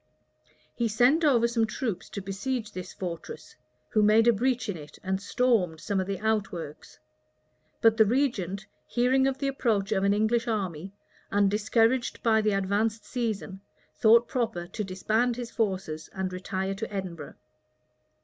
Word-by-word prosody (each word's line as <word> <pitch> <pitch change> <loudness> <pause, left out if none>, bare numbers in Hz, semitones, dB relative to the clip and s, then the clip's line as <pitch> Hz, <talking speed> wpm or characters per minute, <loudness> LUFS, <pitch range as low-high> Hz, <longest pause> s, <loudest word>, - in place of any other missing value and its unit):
He 235 - 0
sent 245 +9 +3
over 245 -6 +4
some 230 -1 +1
troops 215 -3 -4
to 200 - -5
besiege 215 +4 -3
this 185 -1 -7
fortress, 170 -3 -7 0.3
who 215 - +2
made 215 +2 +5
a 235 - +7
breach 245 +2 0
in 205 - -2
it, 150 -2 -11
and 190 +1 -1
stormed 205 -8 +1
some 200 +2 -1
of 185 - -2
the 200 -1 -2
outworks: 195 -7 -3 0.8
but 225 -1 +5
the 220 - +6
regent, 205 -6 0 0.2
hearing 260 +2 +2
of 270 -1 -1
the 275 0 -2
approach 225 -7 0
of 195 -3 +1
an 200 - +3
English 220 +3 +1
army, 190 -5 -3 0.4
and 200 -1 +3
discouraged 225 +4 +1
by 220 -1 +4
the 215 - +2
advanced 205 +3 0
season, 215 -5 -3 0.3
thought 230 +1 +5
proper 225 -8 -2
to 210 +5 -5
disband 220 +6 0
his 240 -1 -6
forces 185 -8 -2
and 190 -1 -3
retire 190 +1 -3
to 215 +3 -5
Edinburgh. 180 -7 -6
215 Hz, 160 wpm, -27 LUFS, 190-235 Hz, 0.8 s, a